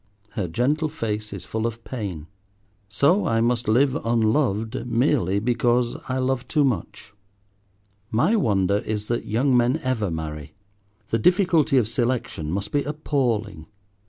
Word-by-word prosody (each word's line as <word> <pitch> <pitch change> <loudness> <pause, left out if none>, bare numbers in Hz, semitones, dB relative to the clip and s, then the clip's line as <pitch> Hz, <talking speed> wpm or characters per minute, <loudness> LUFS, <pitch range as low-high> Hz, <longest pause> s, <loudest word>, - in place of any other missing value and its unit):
Her 105 -6 -3
gentle 145 - 0
face 110 -7 -4
is - - -7
full 110 +1 -2
of 115 0 -7
pain. 100 - -5 0.6
So 140 - +2
I 115 0 +2
must 120 0 0
live 130 +5 +3
unloved 115 0 0
merely 115 - +1
because 120 +1 +1
I 130 - -1
love 130 -1 -1
too 150 -2 +2
much. 110 -6 -3 1.0
My 120 - +2
wonder 100 - +2
is 105 0 -4
that 120 - -1
young 125 +5 +2
men 125 +4 +3
ever 120 -6 0
marry. 75 -2 -6 0.5
The 115 - +1
difficulty 175 - +3
of 120 -5 +3
selection 120 - -2
must 100 +3 -3
be 145 - +1
appalling. 120 - -2
115 Hz, 140 wpm, -23 LUFS, 105-130 Hz, 1.0 s, live